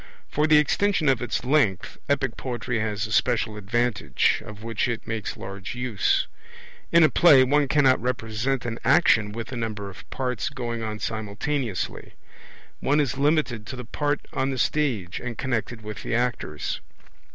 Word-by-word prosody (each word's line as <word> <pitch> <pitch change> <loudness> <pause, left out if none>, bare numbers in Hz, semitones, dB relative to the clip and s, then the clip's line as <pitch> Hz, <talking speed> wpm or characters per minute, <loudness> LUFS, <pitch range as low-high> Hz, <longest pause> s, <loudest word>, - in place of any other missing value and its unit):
For 150 +1 +2
the 155 -1 +6
extension 160 +3 +2
of 130 -4 +2
its 120 -1 -2
length 125 -9 +1
epic 135 -4 +1
poetry 125 -1 -3
has 110 -1 -1
a 110 - -7
special 115 -1 +1
advantage, 105 - +1
of 105 0 -10
which 115 0 -1
it 120 -2 -3
makes 110 -2 -4
large 95 +3 -7
use. 125 -7 +1 0.7
In 170 0 +7
a - - +8
play 145 -7 +7
one 145 +2 +3
cannot 135 -3 +4
represent 125 +1 -1
an 115 -1 -3
action 115 -6 +4
with 115 +3 -6
a - - -4
number 110 -4 -4
of - - -14
parts 125 +1 -2
going 120 -4 -4
on 110 -1 -3
simultaneously; 110 +2 -3 0.7
one 145 +2 +2
is 135 -2 0
limited 140 -7 +1
to - - -5
the 125 -1 -7
part 145 +5 -1
on 130 +1 0
the 135 - -2
stage 120 - 0
and 120 -3 -6
connected 120 -3 -2
with 105 -1 -6
the - - -2
actors. 120 -11 -2
120 Hz, 165 wpm, -25 LUFS, 110-135 Hz, 0.7 s, a